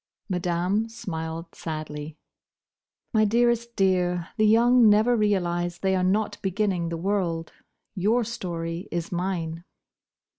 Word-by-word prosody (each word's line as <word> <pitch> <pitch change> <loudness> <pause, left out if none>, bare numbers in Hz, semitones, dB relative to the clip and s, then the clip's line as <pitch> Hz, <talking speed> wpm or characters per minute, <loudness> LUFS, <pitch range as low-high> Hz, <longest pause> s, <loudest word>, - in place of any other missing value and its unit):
Madame 180 +3 0
smiled 165 -5 -6
sadly. 155 -1 -6 1.0
"My 215 -1 +4
dearest 235 +2 +2
dear, 180 -2 +1
the 215 -2 +3
young 235 +1 +6
never 215 +4 +4
realise 175 -5 0
they 190 0 +1
are 185 - +1
not 205 +3 0
beginning 190 -3 0
the 165 - -3
world. 170 -3 -1 0.4
Your 215 +5 +2
story 170 -5 -4
is 170 -1 -3
mine." 170 -2 -3
185 Hz, 115 wpm, -25 LUFS, 170-215 Hz, 1.0 s, young